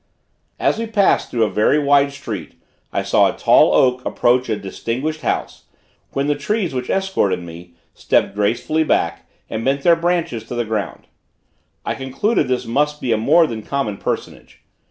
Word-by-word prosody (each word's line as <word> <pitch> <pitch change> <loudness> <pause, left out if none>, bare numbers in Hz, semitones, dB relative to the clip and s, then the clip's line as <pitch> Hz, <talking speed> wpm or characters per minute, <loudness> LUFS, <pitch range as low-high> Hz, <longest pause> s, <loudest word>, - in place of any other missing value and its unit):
As - - +1
we 230 - -3
passed 205 -3 +2
through 115 -2 +1
a 110 - +1
very 105 +7 +3
wide 140 -1 +3
street 140 - -7 0.3
I - - -1
saw - - +3
a - - -14
tall - - +5
oak 125 -1 +3
approach 125 +1 +1
a 110 - +1
distinguished 120 +10 -4
house, - - -3 0.5
when 140 - 0
the 145 - +2
trees 180 +4 -2
which 125 -1 -4
escorted 190 - 0
me, 85 0 -11 0.2
stepped - - +1
gracefully 115 +10 0
back, 155 - -1 0.2
and 110 0 -4
bent 135 +2 0
their 170 -1 +6
branches 165 -9 -1
to 120 - -6
the 120 -1 -1
ground. 110 -2 -4 0.8
I - - -1
concluded 135 - -1
this 125 -1 -1
must 150 +5 0
be 125 - -2
a 110 - +3
more 155 +10 +4
than 115 -7 -5
common 110 -4 -3
personage. - - -6
130 Hz, 175 wpm, -19 LUFS, 115-155 Hz, 0.8 s, their